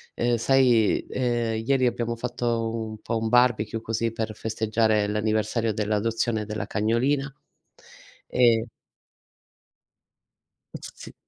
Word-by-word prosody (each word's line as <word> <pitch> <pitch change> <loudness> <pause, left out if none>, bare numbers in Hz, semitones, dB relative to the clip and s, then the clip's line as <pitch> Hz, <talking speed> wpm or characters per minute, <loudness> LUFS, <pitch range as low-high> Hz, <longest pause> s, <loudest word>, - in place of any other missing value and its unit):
uhm, 120 0 +1
sai, 120 -3 +3
uhm, 130 - -4 0.4
ieri 130 -2 +3
abbiamo 120 -1 -2
fatto 115 -1 -2
un 110 -1 -5
po' 115 -1 -2
un 110 0 -2
barbecue, 115 -2 +2
così 115 0 -2
per 110 -1 -3
festeggiare 110 -1 0
l'anniversario 110 +1 0
dell'adozione 110 +1 -1
della 105 -1 -4
cagnolina, 130 +7 0 1.0
ehm 115 -2 +3 2.1
S - - -8
sì. - - -11
115 Hz, 105 wpm, -25 LUFS, 110-120 Hz, 2.1 s, sai